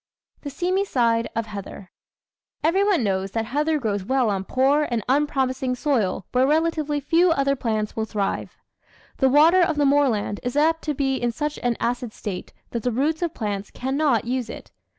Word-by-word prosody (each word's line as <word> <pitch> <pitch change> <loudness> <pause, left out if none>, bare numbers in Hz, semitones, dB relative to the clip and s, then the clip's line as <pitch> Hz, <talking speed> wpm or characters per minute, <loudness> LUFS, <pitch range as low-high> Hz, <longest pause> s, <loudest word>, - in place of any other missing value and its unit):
The 285 - -5
Seamy 360 +7 0
Side 230 -9 +1
of 230 0 -1
Heather 200 -2 -9 0.7
Everyone 380 - +2
knows 195 -1 -1
that 225 -1 -1
heather 300 +6 0
grows 205 -7 -2
well 250 0 +1
on 195 -1 -2
poor 275 +6 +2
and 235 -3 -1
un 285 +4 +3
promising 260 -2 -1
soil 240 - 0
where 255 +1 +3
relatively 310 -1 +1
few 335 +5 +3
other 275 -3 +2
plants 215 -4 -2
will 220 - -1
thrive. 205 -2 -3 0.6
The 265 - +3
water 320 +7 +6
of 325 -3 +2
the 290 - +3
moorland 270 -8 +2
is 245 +1 -4
apt 325 +2 +3
to 300 -2 -1
be 270 -1 0
in 240 -1 -1
such 295 +4 -3
an 245 -2 0
acid 240 -1 -2
state 190 -4 -6 0.2
that 235 - -3
the 245 - -1
roots 295 +7 0
of 340 -2 -2
plants 205 -2 -3
cannot 265 -3 0
use 245 -1 -2
it. - - -9
260 Hz, 185 wpm, -23 LUFS, 225-300 Hz, 0.7 s, water